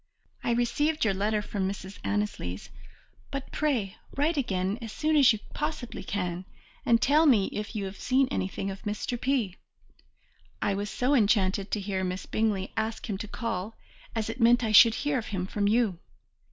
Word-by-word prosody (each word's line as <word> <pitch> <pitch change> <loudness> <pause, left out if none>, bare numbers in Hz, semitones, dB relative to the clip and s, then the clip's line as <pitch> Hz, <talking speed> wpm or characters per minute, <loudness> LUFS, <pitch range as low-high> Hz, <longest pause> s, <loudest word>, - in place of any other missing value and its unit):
I - - -1
received 290 +5 +1
your 205 - +3
letter 210 +2 0
from 190 -3 -2
Mrs. 195 0 -7
Annesley's, 205 - -3 0.6
but 275 -1 -5
pray 245 -11 -1 0.2
write 305 +4 +2
again 195 -5 -1
as 225 -2 -6
soon 310 +6 0
as 280 -4 +7
you 220 - 0 0.2
possibly 300 -5 -4
can 180 -2 -3 0.4
and 230 -1 +5
tell 305 +6 +4
me 215 -8 +4
if 210 +2 -5
you 205 -2 -2
have 195 +1 -7
seen 260 +1 +2
anything 195 -4 -2
of 195 - -8
Mr. 215 +3 -3
P. 245 -9 0 1.0
I 200 - +1
was 205 +1 -3
so 250 +6 +1
enchanted 200 -5 +2
to 210 - -1
hear 195 -1 -2
Miss 185 0 -3
Bingley 210 -3 0
ask 220 +2 -2
him 190 - -3
to 215 - -5
call, 220 -2 -4 0.4
as 220 -1 -1
it 255 - -5
meant 240 +1 +5
I 220 - 0
should 225 +1 +8
hear 290 -1 0
of 230 - -7
him 185 -3 -2
from 200 +1 -1
you. 215 -5 +2
215 Hz, 180 wpm, -28 LUFS, 195-245 Hz, 1.0 s, should